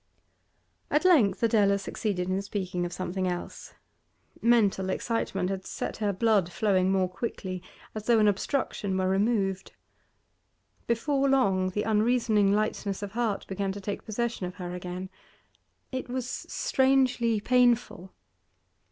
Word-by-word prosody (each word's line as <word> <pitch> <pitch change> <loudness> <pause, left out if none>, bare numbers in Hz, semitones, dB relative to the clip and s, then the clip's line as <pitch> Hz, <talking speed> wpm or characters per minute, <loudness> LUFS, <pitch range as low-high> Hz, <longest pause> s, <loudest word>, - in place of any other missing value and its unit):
At 300 +4 +1
length 235 - +4
Adela 205 -3 +4
succeeded 195 -2 -3
in 190 +1 0
speaking 185 -3 -3
of - - -10
something 185 +1 -3
else. 175 -1 -6 0.7
Mental 210 -5 +3
excitement 195 -3 -1
had 190 -1 -4
set - - -4
her 210 -2 0
blood 200 -3 +2
flowing 190 -3 +2
more 190 -1 +2
quickly, 185 -1 -5 0.3
as 215 -1 -7
though 235 -1 +5
an 215 -1 +4
obstruction 200 -2 -1
were 185 0 +1
removed. 195 -1 0 1.1
Before 275 +4 +1
long 190 -9 +2
the 205 +3 -2
unreasoning 220 -2 +2
lightness 205 -1 -1
of 200 - -5
heart 225 -2 -1
began 195 0 -2
to 205 - -7
take 200 +1 -5
possession 230 -3 -2
of 180 - -9
her 180 -2 -6
again. 180 +1 -6 0.8
It 260 -1 -4
was 250 0 -3
strangely 255 -4 +1
painful. 240 -5 +2
205 Hz, 135 wpm, -28 LUFS, 190-235 Hz, 1.1 s, though